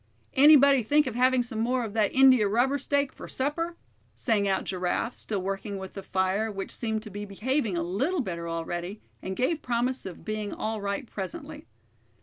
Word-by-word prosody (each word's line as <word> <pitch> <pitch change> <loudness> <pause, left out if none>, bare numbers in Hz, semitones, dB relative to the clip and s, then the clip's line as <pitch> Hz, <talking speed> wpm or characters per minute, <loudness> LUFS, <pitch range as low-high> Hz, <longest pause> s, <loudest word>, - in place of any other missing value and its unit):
"Anybody 280 -1 +7
think 295 +7 +3
of 255 - -3
having 255 +1 +3
some 225 -2 -5
more 245 +2 +1
of 210 - -7
that 215 -3 +2
india 260 -5 +6
rubber 250 +7 +2
steak 280 0 0
for - - -10
supper?" 330 +6 -2 0.4
sang 210 -5 +1
out 195 - +1
Giraffe, 185 +5 -2
still 200 -4 -3
working 195 +1 -3
with 190 -1 -8
the 195 - -6
fire, 190 +4 0
which 195 -1 -5
seemed 220 -2 -2
to 215 - -9
be 205 +1 -5
behaving 210 +1 -1
a 170 - 0
little 265 - 0
better 170 -6 -4
already, 175 +4 -4 0.2
and 190 0 -4
gave 300 +5 0
promise 245 -1 -1
of 180 - -10
being 215 -1 -3
all 220 -1 -3
right 200 +5 -2
presently. 190 - -7
220 Hz, 185 wpm, -27 LUFS, 195-260 Hz, 0.4 s, Anybody